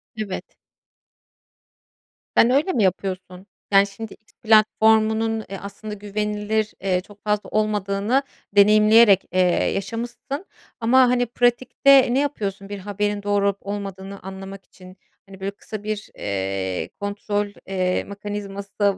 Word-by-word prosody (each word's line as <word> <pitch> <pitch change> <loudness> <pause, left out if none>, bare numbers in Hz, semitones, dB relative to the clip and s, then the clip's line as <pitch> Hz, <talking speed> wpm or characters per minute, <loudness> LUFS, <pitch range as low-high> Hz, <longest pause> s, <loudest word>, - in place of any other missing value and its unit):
Evet. 210 -4 -6 1.8
Sen 235 - +6
öyle 295 +8 +2
mi 225 -6 +2
yapıyorsun? 185 0 -2 0.2
Yani, 195 0 +6
şimdi 220 +2 -8
X 215 - -24
platformunun, 220 0 +3
eee, 195 - -5
aslında 210 +1 -8
güvenilir, 210 +1 -2
eee, 185 -2 +1
çok 205 +1 -18
fazla 210 -1 -1
olmadığını 210 +4 0 0.3
deneyimleyerek, 210 0 +6
eee, 185 - 0 0.3
yaşamışsın. 240 - -5 0.3
Ama, 240 +3 +4
hani, 245 0 +2
pratikte 245 +2 +3
ne 270 - +3
yapıyorsun 200 -9 -3
bir 205 -1 -5
haberin 205 +1 -2
doğru 205 -1 +1
olup 200 0 0
olmadığını 195 -1 -6
anlamak 195 0 -9
için? 185 0 -16 0.3
Hani, 195 -1 -13
böyle, 195 +1 -3
kısa 210 +1 -9
bir, 215 -1 -4
eee, 95 -1 -3
kontrol, 205 0 -2 0.2
eee, 185 -1 0
mekanizması 200 0 -7
da 200 -1 +3
205 Hz, 125 wpm, -22 LUFS, 195-220 Hz, 1.8 s, Sen